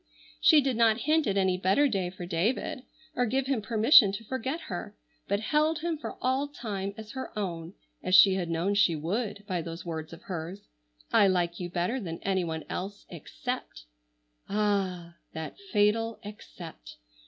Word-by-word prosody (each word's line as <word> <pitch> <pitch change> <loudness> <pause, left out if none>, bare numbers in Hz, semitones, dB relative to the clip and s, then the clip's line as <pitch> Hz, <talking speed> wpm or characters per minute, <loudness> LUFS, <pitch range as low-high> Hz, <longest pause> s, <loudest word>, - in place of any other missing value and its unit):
She 310 -3 +6
did 265 -4 -1
not 225 0 +4
hint 310 +3 +2
at 200 -1 +1
any 190 -1 +2
better 195 +11 +3
day 195 -8 -1
for 180 -1 -8
David, 185 +9 -1 0.3
or 245 0 +1
give 265 +4 0
him 265 -4 0
permission 220 0 +6
to 200 - -5
forget 260 +7 -3
her, 205 - -6 0.3
but 200 +1 +1
held 305 +7 +1
him 335 0 -1
for 300 - -7
all 260 +3 +1
time 205 -8 -5
as 220 -1 -9
her 260 - -6
own, 175 -3 -4 0.3
as 185 0 +2
she 190 +1 +8
had 180 -3 -2
known 170 +4 0
she 200 -5 +4
would 200 +7 -3
by 185 -4 -2
those 165 +1 -7
words 160 -1 -5
of 165 +4 -11
hers, 185 -1 -5 0.5
"I 200 - +6
like 175 -2 0
you 175 -1 -4
better 180 +9 -1
than 165 -7 -5
anyone 175 -5 -1
else 200 +2 -5
except!—" 180 - -6 0.7
Ah! 195 -5 -1 0.2
That 160 - -6
fatal 220 +2 +2
"except!" 200 - -10
200 Hz, 170 wpm, -28 LUFS, 175-235 Hz, 0.7 s, she